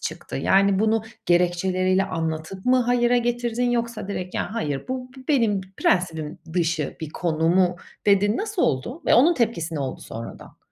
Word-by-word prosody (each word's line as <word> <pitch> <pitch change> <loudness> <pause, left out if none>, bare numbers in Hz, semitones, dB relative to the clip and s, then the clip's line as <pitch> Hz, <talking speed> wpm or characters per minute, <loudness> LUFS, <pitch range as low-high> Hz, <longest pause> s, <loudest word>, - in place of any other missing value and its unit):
çıktı? - - -5
Yani, 195 0 +3
bunu 220 +1 +2 0.2
gerekçeleriyle 185 +2 +2
anlatıp 165 +1 -4
mı 255 +1 +4
hayıra 245 0 +2
getirdin, 240 0 0
yoksa 235 -3 -2
direkt, 185 -2 -5
"Ya, - - -1
hayır. 145 - -3
Bu 255 0 -4
be 260 - -11
benim 225 -9 +2 0.2
prensibim 160 -4 0
dışı 165 -4 -1
bir 160 -2 -5
konu." 165 -1 0
mu 180 0 +3 0.3
dedin? 205 +2 +4
Nasıl 425 -3 -2
oldu 195 - -1
ve - - +5
onun 320 +8 +6
tepkisi 175 - -1
ne 150 - -2
oldu 135 -1 -4
sonradan? 115 +1 -9
190 Hz, 160 wpm, -24 LUFS, 165-240 Hz, 0.3 s, onun